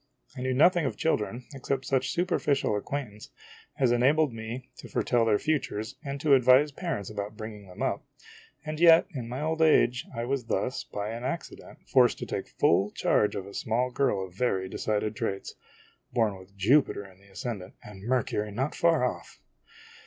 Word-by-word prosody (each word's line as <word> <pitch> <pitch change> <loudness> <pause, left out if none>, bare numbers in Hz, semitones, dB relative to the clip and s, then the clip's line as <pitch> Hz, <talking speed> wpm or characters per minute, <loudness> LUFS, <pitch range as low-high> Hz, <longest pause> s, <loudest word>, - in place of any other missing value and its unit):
I 125 - -6
knew 130 0 0
no 145 - +7
thing 175 -5 0
of - - -4
children, 120 -5 -1
except 135 0 -3
such 135 -2 +1
superficial 170 - +1
acquaintance 105 -1 -5 0.5
as 130 -3 +3
enabled 135 +3 +3
me 115 +3 -7
to - - -11
foretell 120 -2 +1
their 110 -2 +3
futures 125 -8 -2
and 140 -1 -4
to 150 -2 +4
advise 130 +3 +6
parents 140 - -4
about 105 0 -5
bringing 105 -2 -8
them 90 - -6
up; - - -1 0.6
and 155 0 -4
yet 165 -1 +7
in 120 -5 -5
my 125 +3 -4
old 160 +1 -1
age 125 -6 +4
I 115 0 -2
was 130 -1 -2
thus, 125 +2 -1
by 105 0 -5
an 115 +1 -6
accident, 140 +6 -6
forced 125 -3 +4
to - - -5
take - - -4
full 95 +4 +2
charge 105 - +1
of 95 - -4
a 100 - -11
small 120 +5 -1
girl 120 -8 +1
of 90 - -14
very 95 -3 0
decided 105 +2 -2
traits 100 -3 -3 0.6
born 110 -4 +1
with 95 +1 -15
Jupiter 115 +1 +3
in 95 -1 -16
the 100 - -21
ascendant, 95 -1 -6
and 105 -2 -11
Mercury 105 -2 -1
not 130 +8 -2
far 165 -5 +3
off! 125 - -5
120 Hz, 180 wpm, -28 LUFS, 105-140 Hz, 0.6 s, no